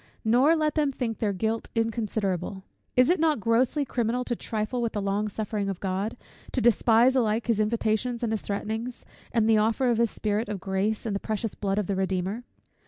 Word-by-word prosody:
Nor 255 +8 +5
let 310 -1 +1
them 300 -2 +2
think 240 -4 -3
their 210 -2 +1
guilt 220 +4 -2
inconsiderable. 210 -5 -1 0.3
Is 250 0 +6
it 360 - +2
not 315 -4 +2
grossly 240 +7 +2
criminal 240 0 -1
to 245 - -2
trifle 220 +2 -2
with 230 -2 -1
the 210 - -1
long 200 +2 0
suffering 210 -1 -3
of 190 -2 -4
God, 195 +4 -2 0.4
to - - +1
despise 240 +2 +4
alike 225 -2 +1
his 230 -3 +1
invitations 225 +2 0
and 225 -1 0
his 220 - -2
threatenings, 220 +4 -4 0.3
and 225 -2 +2
the 220 -1 +5
offer 230 +4 +2
of 230 - +1
his 235 -1 +3
Spirit 210 +1 -2
of 205 -2 -3
grace, 195 +4 -1
and 210 -3 -1
the - - -1
precious 220 0 -3
blood 195 -1 -2
of 210 - +1
the 195 - -1
Redeemer? 190 +4 -2
220 Hz, 200 wpm, -27 LUFS, 205-240 Hz, 0.4 s, Is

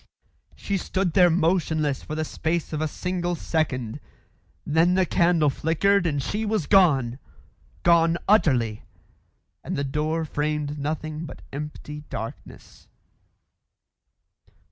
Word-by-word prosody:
She 200 - -2
stood 185 -1 -1
there 180 -2 +6
motionless 160 -4 +1
for 155 - -6
the 155 0 -1
space 160 +1 -2
of 155 - -2
a 155 - +1
single 175 +2 -2
second. 135 -7 -2 0.7
Then 165 +4 +3
the 190 -1 +3
candle 170 -4 +3
flickered 175 +6 +2
and 145 -4 -1
she 210 +9 -2
was 215 -6 0
gone 140 - +4 0.6
gone 170 -1 +4
utterly 130 - +3 0.8
and - - -4
the 140 - 0
door 155 +4 -1
framed 150 0 -2
nothing 155 +2 -4
but - - -11
empty 150 +1 -7
darkness. 110 - -8
160 Hz, 120 wpm, -25 LUFS, 150-175 Hz, 0.8 s, there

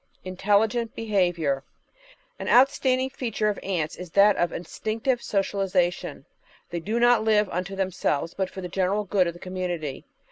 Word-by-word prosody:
Intelligent 210 +5 +1
Behaviour 175 -10 0 0.8
An - - -4
outstanding 260 0 +4
feature 225 -5 -1
of 205 - -3
Ants 170 -5 -2
is 180 -1 -8
that 200 +1 +6
of 175 - 0
instinctive 220 +8 -2
social 200 0 -1
isation. 180 -2 -1 0.5
They 170 - -2
do 215 +8 -2
not 240 -2 +5
live 215 -1 +3
unto 185 +2 -3
themselves, 180 -4 -1
but 190 -1 -2
for 190 - -8
the 180 - -4
general 190 +3 0
good 190 -2 +2
of 170 - -3
the - - -12
community. 175 -6 -4
195 Hz, 155 wpm, -25 LUFS, 175-220 Hz, 0.8 s, that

